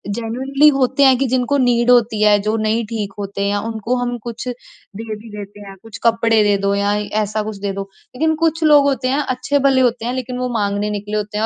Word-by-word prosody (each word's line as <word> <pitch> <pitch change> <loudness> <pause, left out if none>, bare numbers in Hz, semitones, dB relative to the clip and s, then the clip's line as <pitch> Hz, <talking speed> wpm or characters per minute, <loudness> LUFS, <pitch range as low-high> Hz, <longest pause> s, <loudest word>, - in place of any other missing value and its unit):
Genuinely 265 +6 +1
होते 270 0 +1
हैं 265 -2 +6
कि 275 - 0
जिनको 255 +3 0
नीड 245 -1 +2
होती 230 -3 +3
है 210 -1 +5
जो 215 +2 -1
नहीं 220 +1 0
ठीक 210 -3 -4
होते 200 0 -5
हैं 200 0 0
उनको 225 +2 -2
हम 245 0 -2
कुछ 235 +1 -7
दे 225 -2 -9
भी 220 +2 -13
देते 205 0 -9
हैं, 195 -1 -10
कुछ 225 -2 -10
कपड़े 230 -1 +3
दे 205 -1 +3
दो 200 0 0
या 200 0 +1 0.3
ऐसा 215 +1 -2
कुछ 215 -1 -6
दे 200 - -2
दो। 195 - -4 0.3
लेकिन 315 +4 +1
कुछ 325 0 0
लोग 295 -2 +6
होते 255 -2 0
हैं, 275 +3 +1
अच्छे-भले 270 0 +1
होते 235 -2 0
हैं 245 - -2
लेकिन 255 -1 -4
वो 250 0 -2
माँगने 205 -1 -1
निकले 210 +1 -4
होते 210 0 -4
हैं 220 - +1
230 Hz, 225 wpm, -18 LUFS, 210-255 Hz, 0.3 s, हैं